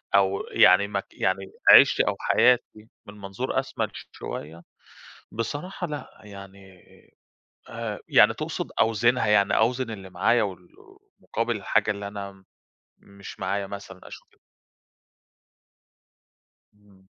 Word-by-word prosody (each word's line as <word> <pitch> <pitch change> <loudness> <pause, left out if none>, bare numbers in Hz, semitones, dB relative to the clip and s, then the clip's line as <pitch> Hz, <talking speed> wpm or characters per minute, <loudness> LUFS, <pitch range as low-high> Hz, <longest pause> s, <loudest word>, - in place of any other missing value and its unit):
أو 100 0 +2
يعني 95 +3 +5
مك 100 -1 -4
يعني 95 +1 -2 0.2
عيشتي - - +7
أو - - 0
حياتي 115 -3 +1 0.2
من 100 - -11
منظور 100 -1 -3
أشمل - - -4 0.2
شوية، 80 +3 -8 0.7
بصراحة 150 - -5
لأ، 145 -6 -9
يعني، 100 -2 -13 0.9
آآ - - -5
يعني - - +5
تقصُد - - -5
أوزِنها، 115 +2 +2
يعني 100 -2 +3
أوزِن 125 +1 0
اللي 95 -3 -9
معايا 110 +6 +2
وال 90 -3 -7 0.5
مقابِل 115 +1 -3
الحاجة 110 +1 0
اللي 100 -1 -6
أنا 100 -1 -9 0.6
مش 100 0 -13
معايا 100 +1 -2
مثلًا 100 -2 -9
أشوف - - -12
ال - - -30 2.4
إمم. 100 -2 -25
100 Hz, 115 wpm, -25 LUFS, 95-110 Hz, 2.4 s, عيشتي